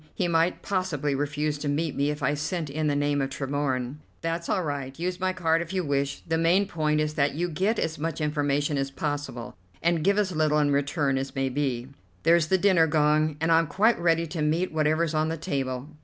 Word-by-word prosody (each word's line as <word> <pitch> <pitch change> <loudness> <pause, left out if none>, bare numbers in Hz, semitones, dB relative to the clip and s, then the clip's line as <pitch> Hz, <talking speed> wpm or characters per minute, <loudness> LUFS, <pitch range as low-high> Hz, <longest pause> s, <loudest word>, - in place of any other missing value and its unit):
He 180 - 0
might 165 +1 +1
possibly 180 -7 -1
refuse 145 +1 -1
to 145 - -4
meet 150 +1 -1
me 140 +1 +1
if 150 -1 -4
I 140 - +2
sent 150 +1 -3
in 155 +1 -1
the 145 - +1
name 145 0 +1
of 135 - -1
Tremorne." 135 -1 -2 0.2
"That's 165 0 -3
all 185 - +1
right. 140 -3 -4
Use 180 +2 -3
my 185 0 +1
card 165 -3 +1
if 170 +2 -6
you 185 -1 0
wish. 140 -1 -1
The 160 0 +1
main 175 +5 +3
point 155 -4 0
is 150 0 0
that 140 -2 +1
you 175 +3 0
get 190 +7 0
as 160 -2 -2
much 165 0 -3
information 145 -1 0
as 135 0 -1
possible, 145 -5 -4 0.2
and 170 -2 +1
give 200 +3 +3
as 190 -4 0
little 155 -1 +2
in 145 -1 +2
return 140 -1 +1
as 135 +2 -5
may 135 0 0
be. 130 -2 -2 0.3
There's 165 -1 +4
the 190 - +3
dinner 185 -4 +4
gong, 155 0 +2
and 160 +2 +1
I'm 165 0 +4
quite 215 +7 +2
ready 165 -1 +2
to 165 0 -5
meet 160 +5 +1
whatever's 155 +1 +1
on 155 0 +1
the 165 - -3
table. 135 -5 -3
150 Hz, 220 wpm, -26 LUFS, 145-165 Hz, 0.3 s, There's